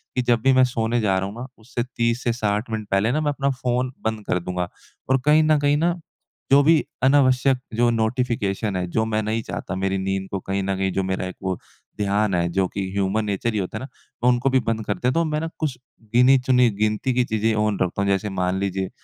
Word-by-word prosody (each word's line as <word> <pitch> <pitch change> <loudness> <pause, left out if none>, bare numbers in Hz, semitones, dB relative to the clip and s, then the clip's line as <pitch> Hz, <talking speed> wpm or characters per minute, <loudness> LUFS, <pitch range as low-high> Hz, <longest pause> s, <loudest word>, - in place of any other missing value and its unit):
कि 125 - +2
जब 120 -1 +2
भी 135 - +5
मैं 130 0 +5
सोने 115 0 0
जा 95 -3 +2
रहा 95 - -2
हूँ 100 - -8
ना 120 +2 -6
उससे 120 +1 -4
30 115 0 -1
से 120 - +1
60 105 0 -1
मिनट 110 -2 -3
पहले 100 +4 +2
ना 155 +4 0
मैं 150 -1 +1
अपना 140 -1 -1
फ़ोन 125 0 -1
बंद 110 -1 -2
कर 90 - +1
दूँगा। 90 0 -3 0.4
और 130 - +4
कहीं 150 +1 +5
न 155 0 +4
कहीं 145 0 +2
ना 170 +3 +2 0.6
जो 140 +1 +7
भी 160 +1 +4 0.2
अनावश्यक 130 -1 +4 0.2
जो 120 +1 +3
नोटिफ़िकेशन 110 -3 -1
है, 90 -1 -1
जो 110 +6 0
मैं 110 -1 0
नहीं 110 +2 -1
चाहता 90 0 -5
मेरी 95 +1 -1
नींद 95 0 -2
को 95 - -2
कहीं 95 +1 -2
न 95 0 -1
कहीं 95 0 0
जो 95 - 0
मेरा 95 0 -2
एक 95 - -8
वो 95 -1 -1 0.4
ध्यान 105 0 +1
है, 85 0 +1
जो 95 +2 +1
कि 95 0 -4
ह्यूमन 100 +2 0
नेचर 105 +3 -1
ही 105 - 0
होता 95 +3 -4
है 115 - -6
ना, - - -6 0.4
उनको 125 +2 +2
भी 130 0 +3
बंद 110 -2 -2
कर 105 - 0
दे 125 - +1
तो 165 +5 +1
मैं 155 -1 -1 0.2
कुछ 145 -6 -2 0.4
गिनी-चुनी 125 0 +5
गिनती 110 +4 +1
की 125 0 +2
चीज़ें 110 0 0
ऑन 105 -2 0
रखता 90 +2 0
हूँ 100 - 0
जैसे 100 +2 0
मान 90 0 -1
लीजिए 95 -1 -2
110 Hz, 235 wpm, -23 LUFS, 95-125 Hz, 0.6 s, जो